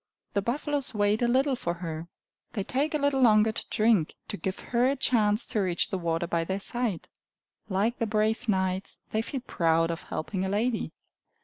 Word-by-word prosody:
The 200 - +1
buffaloes 275 +3 -2
wait 205 +1 +2
a 240 - +3
little 265 +3 +3
for 170 -7 -3
her! 165 -1 -5 0.5
They 200 - -1
take 285 +8 0
a - - +4
little 285 -2 +1
longer 220 -2 +5
to - - -4
drink, 215 -7 +2
to - - -2
give 190 -1 -3 0.2
her 240 +1 +4
a 275 - +2
chance 220 -4 +3
to 215 - -1
reach 180 -3 0
the 190 - -1
water 165 0 0
by 170 0 0
their 190 +3 -2
side. 230 -4 -1 0.6
Like 210 +5 0
the 230 - 0
brave 220 +2 0
knights, 190 -1 0
they 220 - +1
feel 260 +3 -4
proud 165 -6 +1
of 165 - -4
helping 185 +4 -3
a 190 - -1
lady. 220 +4 0
210 Hz, 195 wpm, -28 LUFS, 185-240 Hz, 0.6 s, longer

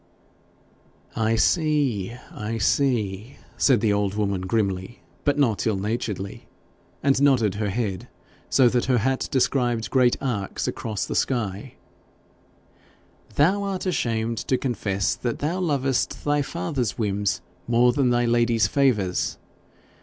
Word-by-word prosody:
'I 115 0 +1
see, 140 - +1 0.2
I 110 +2 -4
see!' 110 -1 0 0.2
said 130 -4 +3
the 110 -3 +2
old 100 -1 0
woman 100 -3 -1
grimly, 95 +2 -2 0.2
but 145 -1 +2
not 120 -7 +1
ill 110 - +2
naturedly, 100 -1 -4 0.6
and 135 -1 +3
nodded 125 -8 +4
her 105 +1 -2
head, 100 -3 -3 0.4
so 130 -2 +5
that 120 0 +1
her 125 -1 +2
hat 130 +4 0
described 120 -4 +1
great 125 -2 +3
arcs 110 -8 -3
across 110 -4 -3
the - - -4
sky; 115 -1 -2 1.6
'thou 185 +8 +3
art 195 -2 -3
ashamed 115 - -1
to 130 - 0
confess 100 -6 -1
that 120 -2 -3
thou 165 +6 -2
lovest 140 -7 -1
thy 145 0 +2
father's 140 -6 -3
whims 100 -2 -1 0.3
more 120 +1 +4
than 130 -2 +2
thy 120 0 +2
lady's 115 -2 +3
favours. 105 -6 +1
120 Hz, 130 wpm, -24 LUFS, 105-135 Hz, 1.6 s, so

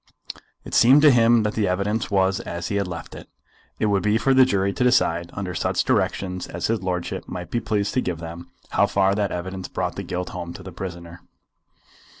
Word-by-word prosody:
It - - -9
seemed 135 +5 +6
to 150 - +8
him 115 -2 +4
that 105 0 -1
the 105 -2 0
evidence 100 +3 -1
was 95 -1 +2
as 85 0 -5
he 100 - -1
had 100 -2 -1
left 85 -2 -7
it. - - -11 0.5
It - - 0
would 100 -2 +2
be 105 +2 +2
for 135 +4 +2
the 130 0 +7
jury 100 -5 0
to 125 - -1
decide, 85 -9 +2
under 95 -2 -4
such - - 0
directions 90 -2 -1
as 85 0 -4
his 115 -3 0
lordship 90 -2 -3
might 90 -1 -6
be 120 - 0
pleased 105 -3 -1
to 130 - +1
give 90 -7 -3
them, 85 +1 -9 0.2
how - - +3
far 95 0 +2
that 100 -1 -1
evidence 95 +1 -5
brought - - -3
the - - -2
guilt 90 0 -4
home 85 -1 -6
to - - -10
the - - -8
prisoner. 85 -2 -8
95 Hz, 215 wpm, -23 LUFS, 90-110 Hz, 0.5 s, to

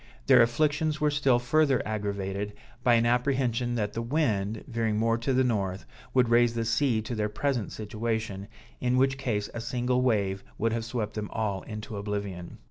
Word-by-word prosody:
Their 130 -3 +7
afflictions 150 +5 +1
were 150 0 +2
still 140 -4 +3
further 135 +2 +2
aggravated 100 -1 -3 0.3
by 120 -1 +5
an 115 0 +3
apprehension 125 -1 +1
that 105 -3 -1
the 115 - -2
wind, 110 -6 0
veering 115 -4 -1
more 115 +1 +2
to 125 +4 -1
the 130 0 +3
north, 100 -6 -1 0.3
would 125 -2 +3
raise 120 0 +4
the 115 -1 -1
sea 115 -1 +1
to 115 - -5
their 105 -2 -1
present 125 0 -1
situation, 110 -2 -3 0.3
in 125 0 +1
which 135 +1 +2
case 105 -6 -1
a 120 - -4
single 125 +1 0
wave 100 -6 +1
would 115 +1 0
have 115 -1 -2
swept 115 -3 -3
them 105 -1 -4
all 100 -4 -2
into 105 -1 -6
oblivion. 100 -4 -4
115 Hz, 180 wpm, -28 LUFS, 105-125 Hz, 0.3 s, Their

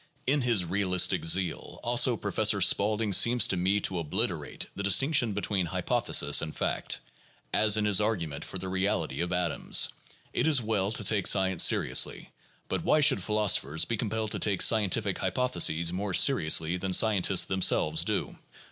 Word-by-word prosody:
In 140 +2 +1
his 115 -7 +1
realistic 90 -1 0
zeal, 90 0 -1
also, 120 0 +2
Professor 105 0 0
Spaulding 105 +3 +1
seems 120 +6 +4
to - - 0
me 95 +3 0
to 90 -2 -2
obliterate 80 -3 -3
the - - -5
distinc 120 - +2
tion 120 -7 +1
between 100 -3 -2
hypothesis 75 -2 +1
and 80 -1 -6
fact, - - -2 0.5
as 110 0 +3
in 105 - 0
his 105 -1 +2
argument 85 -9 -3
for - - -8
the 95 +1 -7
reality 95 -3 -2
of 85 +1 -3
atoms. 90 -2 0 0.4
It - - 0
is 150 -4 +3
well 105 -3 -2
to 110 - -2
take 100 -1 +1
science 95 -3 +2
seriously, - - 0 0.4
but - - -3
why 155 -3 +2
should 145 -2 +3
philoso 105 -2 +1
phers 75 +4 -1
be 115 - -2
compelled 110 0 -4
to - - -4
take 100 -3 0
scientific 105 -2 +1
hypotheses 85 -5 0
more 95 0 -3
seriously 85 - +2
than 95 +1 -4
scientists 100 -3 +2
themselves 95 -1 +1
do? - - -4
100 Hz, 165 wpm, -27 LUFS, 90-110 Hz, 0.5 s, seems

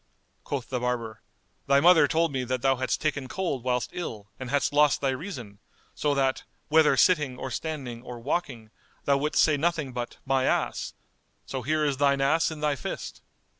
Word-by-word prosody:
Quoth 135 -5 -4
the 125 - -1
barber, 120 -3 -3 0.5
"Thy 140 0 +5
mother 170 +2 +6
told 165 -1 +1
me 130 -2 -2
that 130 0 -2
thou 135 -1 +3
hadst 130 0 -1
taken 145 -3 -1
cold 155 -7 -3
whilst 125 -1 -1
ill, 105 - -6
and 130 -2 -6
hadst 145 +1 +1
lost 145 -1 +4
thy 135 -1 +1
reason, 130 - -7 0.3
so 145 -1 0
that, 135 -1 +1 0.3
whether 160 0 +5
sitting 150 -9 +3
or 130 - -5
standing 135 -6 -4
or 120 -1 -8
walking, 120 -5 -3 0.3
thou 140 -1 +3
wouldst 150 +2 +2
say 155 -2 +3
nothing 155 -4 -1
but 120 -1 -5
My 135 -1 +2
ass! - - -1 0.5
So 130 - -4
here 155 +4 0
is 140 -2 0
thine 140 0 +3
ass 150 +4 +2
in 155 -2 -7
thy 150 -1 +1
fist." 130 - -6
135 Hz, 185 wpm, -27 LUFS, 125-150 Hz, 0.5 s, mother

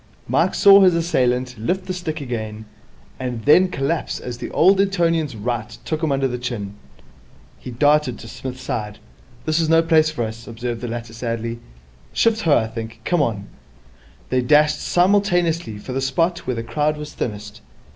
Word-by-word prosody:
Mike - - +1
saw 200 -1 +8
his 185 -3 +5
assailant 125 -7 0
lift 180 - -1
the 185 - -3
stick 160 -3 -4
again, 110 -4 -5 0.5
and 125 -4 -4
then 180 +6 +6
collapse 160 -1 -2
as 125 -1 -7
the - - -5
old 195 +1 +4
Etonian's 165 - 0
right 110 0 -4
took 155 0 -2
him 160 -3 0
under 135 -1 +1
the 125 -1 -4
chin. 115 -5 -4 0.9
He - - -9
darted 145 +1 +2
to - - -11
Psmith's 130 +2 -7
side. 105 -1 -4 0.5
'This 155 +1 +1
is 160 -1 +1
no 165 0 +5
place 160 -1 +4
for 150 -7 -3
us,' 110 +1 -7
observed 115 0 -5
the 125 - -4
latter 115 -1 -6
sadly. 115 0 -4 0.5
'Shift 225 -1 +2
ho, 160 -7 +4
I 110 - +1
think. 110 0 -7
Come 175 -3 +2
on.' 105 -7 -2 0.8
They 130 0 +2
dashed 150 +3 +4
simultaneously 175 - +1
for 125 +5 -7
the 135 - -1
spot 165 +6 0
where 125 - -1
the 115 - -4
crowd 150 +6 -1
was 150 0 -8
thinnest. 105 -2 -5
130 Hz, 175 wpm, -21 LUFS, 115-165 Hz, 0.9 s, saw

